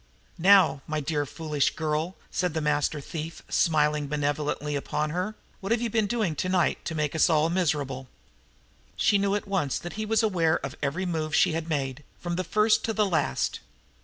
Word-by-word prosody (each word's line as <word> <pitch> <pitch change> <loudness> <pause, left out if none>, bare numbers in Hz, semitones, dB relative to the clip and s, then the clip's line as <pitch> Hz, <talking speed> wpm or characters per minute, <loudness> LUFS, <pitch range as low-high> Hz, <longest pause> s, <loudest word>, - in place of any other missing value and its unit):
"Now, 185 -5 +5
my 155 0 -1
dear, 145 0 -1
foolish 150 -1 -1
girl," 160 +3 -1 0.2
said 180 -3 -1
the - - +1
master 150 0 0
thief, 155 +2 -6
smiling 150 -2 +2
benevolently 145 0 -1
upon 150 +2 -2
her, 185 +6 -2 0.2
"what 195 - -5
have 230 - +3
you 235 -1 -2
been 220 -2 +2
doing 215 -8 0
tonight 185 +2 +1
to 160 - -3
make 150 -2 -1
us 160 - +4
all 160 0 +3
miserable?" 140 -7 -1 0.9
She 205 - +3
knew 200 0 +1
at 205 - -3
once 185 -9 0
that 175 - -7
he 215 - -3
was 225 +1 +2
aware 170 -7 +2
of 140 - -6
every 150 +7 -1
move 155 -3 -1
she - - +4
had 165 +1 -3
made, 140 -2 -2 0.2
from 175 -1 -3
the 185 - -1
first 215 +3 +3
to 225 - -1
the 215 -1 +2
last. 160 -7 0
160 Hz, 190 wpm, -27 LUFS, 150-185 Hz, 0.9 s, Now